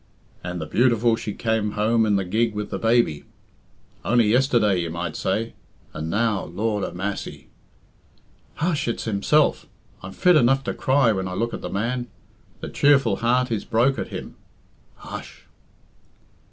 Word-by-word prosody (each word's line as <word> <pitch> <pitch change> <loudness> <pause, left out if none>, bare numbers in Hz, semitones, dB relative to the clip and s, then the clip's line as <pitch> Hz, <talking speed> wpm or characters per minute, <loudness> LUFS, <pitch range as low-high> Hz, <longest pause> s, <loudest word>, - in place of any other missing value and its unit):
"And 90 0 -4
the 80 - -4
beautiful 115 +5 +2
she 110 - -5
came 110 -2 -1
home 110 +1 +2
in 105 - +2
the 95 -1 0
gig 110 +4 0
with 105 0 -4
the - - -3
baby! 115 -10 +2 0.8
Only 120 -1 +3
yesterday 115 -5 +3
you 85 -1 -2
might 85 -1 -4
say. 110 +4 -2 0.4
And 80 +1 -5
now, 105 +2 0
Lord 105 +3 -2
a - - -3
massy!" 95 +3 -5 1.1
"Hush! 160 -4 -1
it's 115 - -2
himself! 115 +8 +1 0.3
I'm 90 - -8
fit 180 -2 +4
enough 135 0 +3
to - - -3
cry 135 -3 +2
when 95 -3 -2
I 90 - -5
look 115 +4 -2
at - - -5
the - - -5
man. 120 +5 -2 0.5
The - - -5
cheerful 135 -8 +3
heart 125 +1 +1
is 110 - -1
broke 120 +4 +1
at - - -3
him." - - -8 0.6
"Hush!" - - -10
110 Hz, 160 wpm, -23 LUFS, 100-120 Hz, 1.1 s, fit